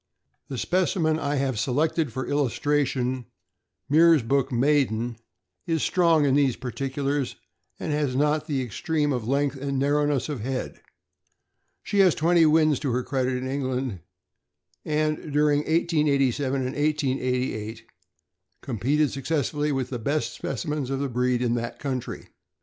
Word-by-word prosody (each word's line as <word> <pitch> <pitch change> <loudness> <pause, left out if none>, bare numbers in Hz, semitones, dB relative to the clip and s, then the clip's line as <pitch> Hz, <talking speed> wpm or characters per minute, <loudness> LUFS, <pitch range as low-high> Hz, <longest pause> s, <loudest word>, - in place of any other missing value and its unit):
The 135 - -5
specimen 170 -1 +1
I 145 -1 -1
have 135 -5 -1
selected 150 +4 0
for 130 +3 -4
illustration, 130 -3 0 0.6
Meersbrook 140 -4 +4
Maiden 120 -3 +1 0.5
(13744), 165 - +1
is 160 - -1
strong 165 -4 +3
in 135 - +3
these 135 -4 +3
particulars, 135 +1 -2 0.4
and - - -3
has 145 -4 0
not 150 +2 +1
the 140 -4 -1
extreme 145 +5 -1
of 120 -3 -3
length 140 +1 0
and 140 0 -3
narrowness 145 -1 +1
of 150 -5 -4
head. 130 +4 -4 1.0
She 205 - -1
has 185 -4 +5
twenty 165 0 +4
wins 155 -2 +4
to 140 -4 -2
her 125 +1 0
credit 130 -1 -1
in 130 +1 -4
England, 130 -5 -2 0.8
and 155 0 -1
during 145 0 +3
1887 145 -4 +1
and 130 - -4
1888 130 -7 -1 0.8
competed 135 +4 0
successfully 150 +1 -1
with 135 -2 -2
the 125 - -3
best 145 +7 -2
speci 130 -5 -3
mens 150 -4 -2
of 135 0 -1
the 140 -1 -1
breed 125 0 0
in 120 -1 +1
that 115 -1 -3
country. 130 -4 -5
140 Hz, 140 wpm, -25 LUFS, 125-150 Hz, 1.0 s, has